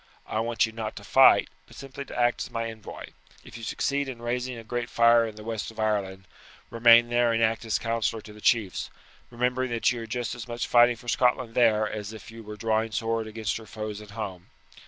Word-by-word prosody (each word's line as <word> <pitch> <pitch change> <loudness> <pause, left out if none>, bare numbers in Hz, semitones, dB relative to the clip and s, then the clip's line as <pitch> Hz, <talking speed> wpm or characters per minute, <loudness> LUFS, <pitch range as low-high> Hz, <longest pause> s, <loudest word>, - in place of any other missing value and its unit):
I 110 - -2
want 115 +1 +1
you 110 - -7
not 110 -1 -5
to - - -9
fight, - - +6 0.2
but - - -16
simply 135 +1 -8
to - - -7
act 120 0 +2
as - - -4
my 115 0 -3
envoy. 110 -1 -10 0.3
If - - -13
you 115 - -8
succeed 140 +4 -1
in 125 -3 -7
raising 125 +1 -3
a 115 - -9
great 120 +1 -4
fire 115 0 +5
in 110 - -8
the 105 - -10
west 110 -3 -4
of 110 -1 -13
Ireland, 100 -3 -1 0.5
remain 115 0 +6
there 120 0 +3
and 115 0 +1
act 110 +1 +1
as 110 - +1
councillor 115 -1 -2
to 105 - -12
the 105 - -14
chiefs, 105 -6 +1 0.4
remembering 125 +1 -1
that 115 +1 +1
you 120 -2 -4
are 115 - -7
just 120 +2 -3
as 120 0 -8
much 120 -1 -3
fighting 120 0 +5
for 120 +1 -16
Scotland 125 -1 +1
there 110 -3 +3
as 105 0 -6
if 110 +1 -11
you 115 0 -10
were 105 -1 -9
drawing 110 +1 0
sword 115 -1 -1
against 110 -1 -3
her 110 -1 -11
foes 105 -1 -6
at 105 - -12
home. 90 -2 -6
115 Hz, 230 wpm, -26 LUFS, 110-120 Hz, 0.5 s, fight